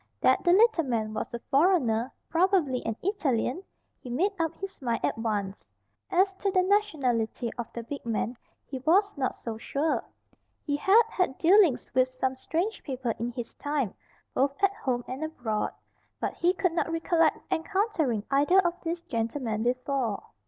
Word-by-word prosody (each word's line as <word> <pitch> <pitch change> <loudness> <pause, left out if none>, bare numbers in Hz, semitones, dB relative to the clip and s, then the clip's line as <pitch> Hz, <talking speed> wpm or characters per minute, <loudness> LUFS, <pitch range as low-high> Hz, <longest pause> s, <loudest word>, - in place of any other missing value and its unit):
That 260 - +3
the 345 - +4
little 410 -2 +5
man 220 -4 -1
was 215 - -4
a 235 - -3
foreigner, 270 -7 +3 0.2
probably 335 -7 +2
an 225 - -1
Italian, 320 - 0 0.4
he 250 - -10
made 340 +12 +1
up 330 0 0
his 390 -4 -8
mind 235 -3 -1
at - - 0
once. 210 -3 -3 0.4
As 380 +2 +3
to 395 - 0
the 370 -1 +3
nationality 265 - 0
of 240 -2 -6
the 235 - -6
big 280 +5 -6
man 230 +1 -2 0.3
he 265 - -6
was 385 +9 +3
not 265 -2 -1
so 225 -2 -6
sure. 290 +6 -1 0.6
He 285 - 0
had 400 +10 +5
had 360 -8 0
dealings 350 -7 +4
with 255 0 +4
some 255 0 -2
strange 340 +11 -2
people 260 -4 -3
in 235 +2 -2
his 240 -2 -6
time, 285 -8 -2 0.4
both 280 +6 0
at 395 0 +4
home 255 - -2
and 265 +4 -5
abroad. 240 -9 -2 0.5
But - - -2
he 350 +1 +2
could 360 -2 +1
not 330 -1 0
recollect 330 -1 +2
encountering 325 - 0
either 290 +7 +4
of 350 -2 +2
these 335 0 -3
gentlemen 230 -5 -2
before. 250 -2 -1
280 Hz, 165 wpm, -28 LUFS, 240-355 Hz, 0.6 s, little